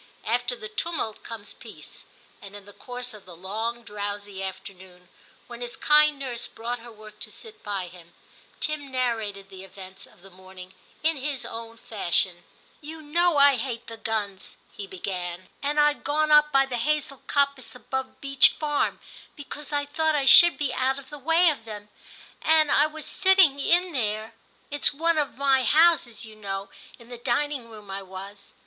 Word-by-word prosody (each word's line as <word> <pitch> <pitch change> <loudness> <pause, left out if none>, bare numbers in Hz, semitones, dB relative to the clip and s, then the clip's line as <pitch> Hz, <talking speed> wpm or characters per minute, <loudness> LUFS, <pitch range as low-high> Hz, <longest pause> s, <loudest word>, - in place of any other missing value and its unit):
After 245 +2 0
the 215 - -8
tumult 220 -1 -3
comes 220 -3 -8
peace, - - -12 0.4
and 200 0 -11
in 205 -1 -11
the 205 - -13
course 245 +1 -6
of 210 -3 -14
the 175 - -11
long, 220 +7 -4
drowsy 205 -2 -5
afternoon, 185 -1 -8 0.4
when 240 0 -10
his 240 0 -5
kind 300 0 +6
nurse 250 -4 -4
brought 235 +2 -5
her 235 +1 -12
work 215 -1 -14
to - - -7
sit 445 -2 -10
by 200 -3 -3
him, 175 -1 -15 0.4
Tim 305 -2 -2
narrated 225 -6 -2
the 190 0 -10
events 190 0 -11
of 175 - -23
the 195 - -15
morning 185 0 -12 0.3
in 320 -1 +2
his 275 -1 -3
own 230 0 -8
fashion. 180 -5 -1 0.4
*You 310 +1 -9
know 340 +2 +2
I 280 -1 +6
hate 235 -1 -4
the 230 - -8
guns/ 215 -4 -4
he 200 - -8
began, 180 -1 -5
* - - -36
and 290 +2 0
I 295 0 +5
*d - - -19
gone 305 +1 0
up 300 0 +6
by 270 -1 +4
the 255 -2 -4
hazel 280 0 -1
coppice 280 -4 0
above 265 +1 -5
Beech 275 -1 +4
Farm, 295 -2 0 0.4
because 295 0 -8
I 290 -1 0
thought 315 +2 0
I 280 -2 +1
should 345 +5 +8
be 290 -3 -1
out 265 +1 +1
of 280 0 -11
the 295 - -8
way 330 +4 +4
of 270 -6 -7
them, 210 -2 -9 0.5
and 315 -2 +4
I 295 - +5
was 310 0 -8
sitting 375 -7 +4
in 350 +5 +3
there; 220 -4 -2 0.4
it 290 -1 -4
s - - +4
one 330 +1 +2
of 290 -3 -2
my 270 -1 +3
houses, 290 -7 +3
you 220 -1 -12
know, 195 -2 -5
— - - -20
in 235 0 -17
the 245 -1 -8
dining 255 0 -1
room 210 -3 -11
I 195 +1 -4
was. 195 +1 -10
240 Hz, 190 wpm, -26 LUFS, 205-290 Hz, 0.5 s, should